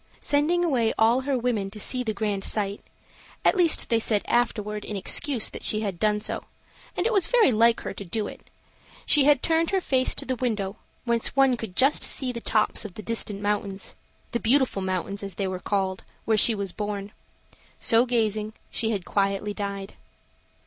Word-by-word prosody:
Sending 315 +5 +1
away 240 -8 +1
all 230 +3 +4
her 270 0 -1
women 230 -5 -1
to 210 +2 -10
see 250 +4 0
the 230 -3 -1
grand 205 -2 -2
sight, 200 -1 -2 0.6
at - - +5
least 350 -4 +4
they 230 - +3
said 215 -2 +1
afterward, 210 -3 0
in 210 - -6
excuse, 230 +5 0
that - - -8
she 215 - +2
had 195 -5 -4
done 210 -1 +2
so, 210 - -4 0.5
and 355 - 0
it 470 - +1
was 390 -5 +2
very 475 - +4
like 230 +1 +3
her - - -5
to - - -8
do 205 +4 -3
it, - - -10 0.6
she 290 -3 +5
had 290 -2 +4
turned 330 0 +2
with - - -5
her 385 - +3
face 260 -5 +2
to - - -4
the 260 - -1
window, 215 -5 -2 0.3
whence 235 0 0
one 270 -2 +4
could 225 -6 -7
just 270 +3 +4
see 260 -2 +2
the 235 -1 -6
tops 215 0 0
of 210 -5 -9
the 215 - -8
distant 210 -3 -2
mountains 205 -1 -2 0.4
the 235 - -1
Beautiful 245 -3 +2
Mountains, 190 +1 -3
as 200 -1 -6
they 195 - -2
were 185 -1 -4
called 190 -1 -2 0.2
where 220 - +2
she 220 +1 +6
was 200 -2 -3
born. 205 0 -5 0.7
So 230 +2 +3
gazing, 215 -3 0 0.2
she 225 - 0
had 200 -5 -2
quietly 200 +1 -1
died. 200 -1 -5
220 Hz, 195 wpm, -25 LUFS, 200-255 Hz, 0.7 s, she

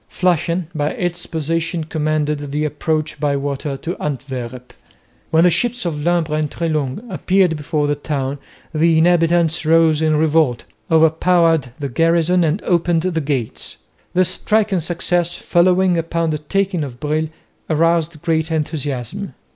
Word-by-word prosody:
Flushing 175 0 0
by 150 -2 0
its 175 -1 -3
position 165 +1 -2
commanded 150 -2 -1
the 150 +2 -1
approach 155 +1 -2
by 145 -2 +1
water 140 0 -3
to 170 +6 -4
Antwerp. 125 -3 -5 0.6
When 160 +1 +4
the 180 - +5
ships 245 +3 -1
of 155 -4 -2
Lumbres 165 -2 +1
and 150 -1 -1
Treslong 155 - -2
appeared 185 -6 +1
before 150 0 -1
the 145 - +1
town, 145 -2 -3 0.3
the 165 +1 +3
inhabitants 165 -1 +3
rose 160 -1 +4
in 155 -1 +2
revolt, 155 -6 +2 0.2
over 160 -1 +5
powered 165 -3 +2
the 145 - -3
garrison, 165 +5 +2
and 165 +5 0
opened 170 -2 +1
the 175 -3 -1
gates. 135 -6 -3 0.4
This 185 -1 +4
striking 210 0 +1
success, 175 +1 -1
following 180 0 +2
upon 165 0 -1
the 150 - -2
taking 185 +2 -1
of 125 -4 -7
Brill, 155 +2 -1 0.4
aroused 165 0 +1
great 160 -1 0
enthusiasm. 150 - -3
160 Hz, 145 wpm, -19 LUFS, 150-175 Hz, 0.6 s, the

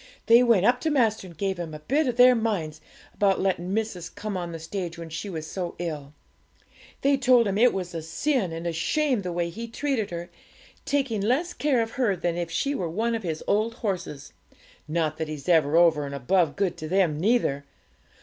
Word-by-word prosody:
They 235 +1 +7
went 230 -6 +4
up 245 +2 +3
to 320 - 0
master, 225 -9 +1
and 170 -3 -14
gave 190 0 -2
him 160 -3 -5
a - - -8
bit 275 - 0
of 245 -1 -2
their 250 0 +8
minds 195 -10 -2 0.3
about 195 -2 +2
letting 185 -1 -1
missis 200 -5 -2
come 210 -1 -6
on 175 -2 -4
the 165 - -5
stage 170 +1 -5
when 165 -1 -8
she 160 +6 -5
was 160 -4 -5
so 175 +1 -5
ill. 150 -4 -5 0.9
They 280 0 +3
told 250 -3 +4
him 195 - -1
it 240 +3 +5
was 180 -2 -4
a 165 - -4
sin 190 - -1
and 165 +1 -6
a 170 - -1
shame 265 - 0
the 180 -2 -4
way 170 0 -2
he 230 +6 -6
treated 230 -3 -2
her, 175 0 -6 0.5
taking 270 -7 0
less 275 - 0
care 275 -8 +1
of 225 - -7
her 210 -6 +2
than 175 -1 -2
if 170 -1 -3
she 170 +13 -1
were 180 -11 -2
one 225 +7 -1
of 225 - -2
his 160 -5 -4
old 220 +3 +1
horses 185 - -4 0.5
(not 155 -1 -1
that 160 - -2
he's 150 -3 -7
over 160 -1 +4
and 140 - -6
above 155 +4 +1
good 185 -3 -1
to 155 - -6
them 175 -4 +1
neither). 185 - +1
185 Hz, 210 wpm, -26 LUFS, 165-230 Hz, 0.9 s, their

